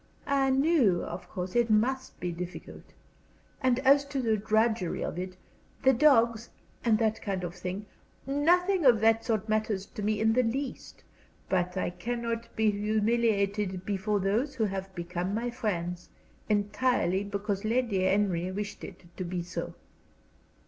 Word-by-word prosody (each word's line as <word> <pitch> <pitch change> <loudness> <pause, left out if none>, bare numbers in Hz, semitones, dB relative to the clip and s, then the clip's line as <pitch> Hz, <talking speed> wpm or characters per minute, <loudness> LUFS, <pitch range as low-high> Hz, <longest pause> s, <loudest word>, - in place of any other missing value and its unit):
"I 275 -1 +2
knew, 265 - +3
of 175 +2 -7
course, 180 +2 -5
it 240 -1 +3
must 255 +5 +1
be 175 - -2
difficult. 175 +1 -8 0.7
And 255 -2 +3
as 280 +1 +5
to 280 -1 -3
the 225 -4 +2
drudgery 220 -2 +1
of 175 - -4
it 185 0 -6 0.5
the 265 0 +6
dogs, 235 -4 +4 0.3
and 225 -3 +4
that 220 0 0
kind 195 -3 -3
of 175 -1 -4
thing 180 +3 -5 0.4
nothing 350 +6 +2
of 245 -5 +6
that 225 0 +4
sort 220 -2 -1
matters 215 -2 0
to 210 - -8
me 210 0 0
in 220 +1 +3
the 255 - +4
least. 255 +4 -4 0.5
But 180 0 0
I 185 - -1
cannot 230 +4 -4
be 220 -1 +3
humiliated 210 -2 0
before 205 +1 0
those 225 +9 0
who 235 - 0
have 195 -2 -3
become 175 +2 -3
my 240 +2 -2
friends, 180 -8 -3 0.4
entirely 205 -1 +1
because 200 0 -3
Lady 225 -3 +1
Henry 185 -2 +1
wished 205 +2 -5
it 190 -2 -9
to 185 - -3
be 175 0 -3
so." 175 - -5
215 Hz, 155 wpm, -29 LUFS, 190-235 Hz, 0.7 s, the